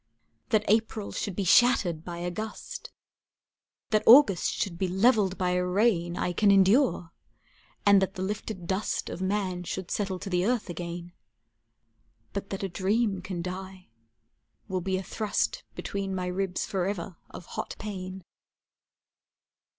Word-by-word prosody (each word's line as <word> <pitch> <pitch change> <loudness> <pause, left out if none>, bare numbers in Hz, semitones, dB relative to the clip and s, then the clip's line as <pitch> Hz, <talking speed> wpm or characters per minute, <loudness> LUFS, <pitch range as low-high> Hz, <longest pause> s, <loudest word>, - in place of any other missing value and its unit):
That 215 -1 +2
April 220 -1 +1
should 200 - -3
be 200 - -1
shattered 180 -6 +4
by 170 0 -6
a 175 +1 -3
gust, 220 - -6 1.0
That 215 -1 +4
August 240 -6 +7
should 175 -5 -3
be 190 - +1
leveled 195 0 +3
by 180 -1 0
a 180 0 +1
rain, 180 -2 +1
I 180 - -1
can 205 +3 +3
endure, 195 - +4 0.7
and 200 -1 +7
that 190 0 -1
the 185 - -3
lifted 205 -2 -4
dust 190 +4 -2
Of - - -6
man 190 -2 -1
should 180 +1 -5
settle 195 -3 -1
to 195 +2 -7
the 180 0 +2
earth 230 -3 0
again; 175 0 -6 1.2
But 200 0 -4
that 195 0 -4
a - - 0
dream 195 +2 0
can 180 -3 -5
die, 185 -1 -7 0.8
will 185 -3 -2
be 190 +1 -1
a 190 - -4
thrust 215 +2 -1
Between 195 -1 -3
my 185 -1 -2
ribs 180 0 -2
forever 185 -2 -3
of - - -10
hot - - -5
pain. 190 -3 -6
190 Hz, 150 wpm, -28 LUFS, 180-205 Hz, 1.2 s, August